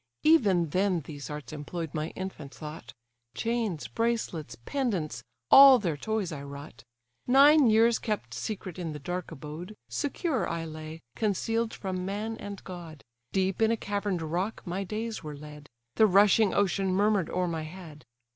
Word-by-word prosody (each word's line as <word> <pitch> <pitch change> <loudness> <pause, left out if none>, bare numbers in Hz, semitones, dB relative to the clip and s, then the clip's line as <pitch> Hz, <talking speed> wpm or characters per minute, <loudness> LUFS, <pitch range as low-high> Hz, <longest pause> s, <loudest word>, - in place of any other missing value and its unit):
Even 200 - +4
then 185 +1 +1
these 145 0 -8
arts 150 0 -7
employ'd 155 +1 -5
my 155 0 -2
infant 185 -7 -6
thought: 155 +1 -8 0.4
Chains, 225 -8 -1
bracelets, 220 - -2
pendants, 220 - -2 0.3
all 270 -1 +10
their 175 -9 -1
toys, 215 +3 -2
I 145 -3 -5
wrought. 140 -2 -10 0.4
Nine 280 +2 +7
years 225 +1 +4
kept 215 -3 -3
secret 190 -5 -5
in 165 -3 -4
the 150 - -6
dark 180 +6 -4
abode, 160 +6 -8
Secure 290 -2 -1
I 165 -1 -3
lay, 155 0 -8
conceal'd 225 +2 0
from 185 -2 -4
man 210 +4 -3
and 200 -1 -8
god: 170 -5 -9 0.3
Deep 190 +1 0
in 220 - +5
a 230 - +1
cavern'd 200 -4 -2
rock 180 +7 -2
my 185 +2 -2
days 220 +3 -4
were 150 -2 -7
led; 150 0 -11 0.3
The 220 - +7
rushing 205 +2 +5
ocean 195 -1 +1
murmur'd 200 -1 +2
o'er 180 0 0
my 165 -2 -2
head. 155 -2 -10
185 Hz, 155 wpm, -28 LUFS, 155-220 Hz, 0.4 s, all